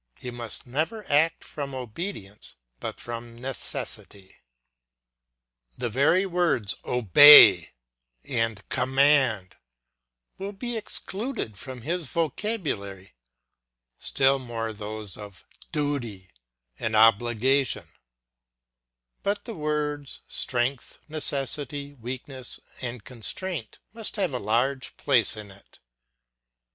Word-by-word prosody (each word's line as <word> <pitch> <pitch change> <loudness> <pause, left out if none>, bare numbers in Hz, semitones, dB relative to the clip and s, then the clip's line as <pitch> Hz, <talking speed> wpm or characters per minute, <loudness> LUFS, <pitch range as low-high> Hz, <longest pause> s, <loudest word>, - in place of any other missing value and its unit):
] - - -34
he 125 - -6
must 120 -2 -8
never 160 - -2
act 160 +3 +3
from 140 -2 -6
obedience, 120 - -7 0.2
but - - -6
from 120 0 -7
necessity. 110 -6 -4 1.4
The 120 - -3
very 150 - +3
words 175 - +1
OBEY 115 - +9 0.5
and 115 -3 -2
COMMAND 130 - +2 0.8
will 200 +1 -5
be 240 +4 -4
excluded 210 - -3
from 125 +2 -8
his 170 +2 -2
vocabulary, 140 - -3 0.9
still 135 0 +2
more 115 -3 -4
those 105 -1 -6
of 105 -3 -11 0.3
DUTY 120 -11 -2 0.5
and 110 -1 -1
OBLIGATION; 120 +4 +3 1.4
but 200 +1 -1
the 235 - -6
words 150 -2 -3
strength, 125 +1 -2
necessity, 145 -1 -2
weakness, 130 +1 -7 0.2
and 120 -3 -5
constraint 130 - -4 0.2
must 225 -1 -4
have 190 -8 -1
a 125 - -1
large 125 +6 0
place 120 -5 +2
in 105 -2 -8
it. 95 0 -17
130 Hz, 100 wpm, -26 LUFS, 115-150 Hz, 1.4 s, OBEY